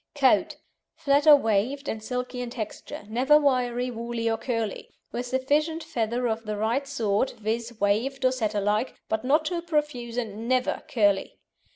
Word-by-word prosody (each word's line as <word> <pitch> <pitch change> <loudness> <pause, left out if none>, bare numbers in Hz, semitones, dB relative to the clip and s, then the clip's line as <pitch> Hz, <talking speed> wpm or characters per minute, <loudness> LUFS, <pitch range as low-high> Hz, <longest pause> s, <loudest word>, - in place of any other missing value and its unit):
COAT - - +3 0.4
Flat 285 +2 +2
or 300 - +11
waved, 255 +3 0
and 220 - -3
silky 250 +2 -4
in 245 - -4
texture, 215 -3 -6
never 260 +7 +4
wiry, 250 -3 +1
woolly, 230 0 -3
or 225 - +2
curly, 230 -4 -3 0.2
with 245 +1 -4
sufficient 295 +6 0
feather 245 -5 -1
of 225 0 -2
the 210 -1 -2
right 235 +6 0
sort, 215 0 0
viz., 225 +1 -3
waved 245 +7 +1
or 255 - +5
Setter 215 -5 -1
like, 210 +5 0
but 220 +1 -1
not 300 +5 +3
too 340 +2 -1
profuse 295 -8 -2
and 225 -1 -4
never 255 0 +1
curly. 205 -4 +1
245 Hz, 165 wpm, -26 LUFS, 220-270 Hz, 0.4 s, or